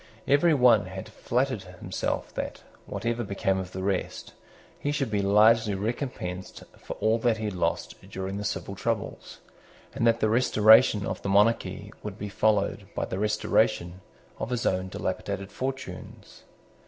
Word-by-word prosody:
Every 150 Hz, +3 st, +4 dB
one 120 Hz, -7 st, +5 dB
had 95 Hz, +2 st, -7 dB
flattered 125 Hz, +1 st, -1 dB
himself 90 Hz, -2 st, -4 dB
that, -, -, -5 dB, 0.2 s
whatever 120 Hz, 0 st, -2 dB
became 95 Hz, -2 st, 0 dB
of 95 Hz, -1 st, -6 dB
the 95 Hz, 0 st, -5 dB
rest, 95 Hz, -1 st, -2 dB, 0.5 s
he 145 Hz, -, -1 dB
should 140 Hz, -6 st, -1 dB
be 105 Hz, -1 st, +1 dB
largely 105 Hz, +1 st, +4 dB
recompensed 100 Hz, -4 st, -4 dB
for -, -, -7 dB
all 110 Hz, +1 st, +1 dB
that 115 Hz, -1 st, +2 dB
he 110 Hz, -, -4 dB
had 105 Hz, -, -2 dB
lost 90 Hz, -, -2 dB
during 95 Hz, +1 st, -4 dB
the 105 Hz, -, -4 dB
civil 100 Hz, -1 st, -3 dB
troubles, 110 Hz, +1 st, -4 dB, 0.5 s
and 115 Hz, -, +1 dB
that 115 Hz, 0 st, +3 dB
the 110 Hz, -, +2 dB
restoration 110 Hz, -2 st, +5 dB
of -, -, -4 dB
the 100 Hz, -, -3 dB
monarchy 100 Hz, -1 st, +2 dB
would 105 Hz, -2 st, -6 dB
be 105 Hz, -, -5 dB
followed 105 Hz, 0 st, +1 dB
by -, -, -1 dB
the 95 Hz, -, -4 dB
restoration 100 Hz, -4 st, +1 dB, 0.4 s
of -, -, -3 dB
his 125 Hz, -1 st, -2 dB
own 95 Hz, 0 st, +1 dB
dilapidated 100 Hz, +1 st, -4 dB
fortunes. 135 Hz, +1 st, -7 dB
105 Hz, 155 wpm, -27 LUFS, 95-115 Hz, 0.5 s, one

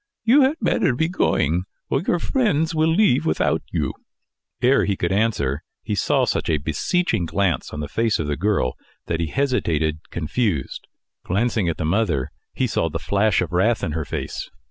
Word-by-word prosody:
"You 245 Hz, +6 st, +6 dB
had 270 Hz, +3 st, +3 dB
better 170 Hz, -, +1 dB
be 160 Hz, +6 st, +1 dB
going, 90 Hz, -, +1 dB, 0.3 s
or 135 Hz, -, +2 dB
your 175 Hz, -, +1 dB
friends 170 Hz, -, +1 dB
will 160 Hz, 0 st, +2 dB
leave 165 Hz, -, +3 dB
without 80 Hz, -, +1 dB
you." -, -, -1 dB, 0.7 s
Ere 130 Hz, +2 st, +4 dB
he 100 Hz, -, 0 dB
could 85 Hz, -, -1 dB
answer, 95 Hz, -10 st, 0 dB, 0.2 s
he -, -, -3 dB
saw -, -, +2 dB
such -, -, -1 dB
a 80 Hz, -, +3 dB
beseeching 85 Hz, -, 0 dB
glance 90 Hz, -5 st, 0 dB
on 75 Hz, -, -5 dB
the 75 Hz, -, -4 dB
face 115 Hz, +7 st, +1 dB
of 80 Hz, -, -2 dB
the 75 Hz, 0 st, -1 dB
girl, 95 Hz, -8 st, 0 dB, 0.3 s
that 80 Hz, -, -2 dB
he 85 Hz, -, 0 dB
hesitated, 80 Hz, -, 0 dB
confused. 85 Hz, -, -2 dB, 0.4 s
Glancing 105 Hz, -1 st, 0 dB
at 80 Hz, -, -2 dB
the -, -, -2 dB
mother, 85 Hz, -7 st, 0 dB, 0.2 s
he -, -, +1 dB
saw -, -, 0 dB
the -, -, -3 dB
flash 100 Hz, +1 st, +1 dB
of 85 Hz, -, -6 dB
wrath 100 Hz, +6 st, +2 dB
in 80 Hz, -, -1 dB
her 80 Hz, +1 st, -2 dB
face. -, -, -5 dB
100 Hz, 185 wpm, -22 LUFS, -, 0.7 s, You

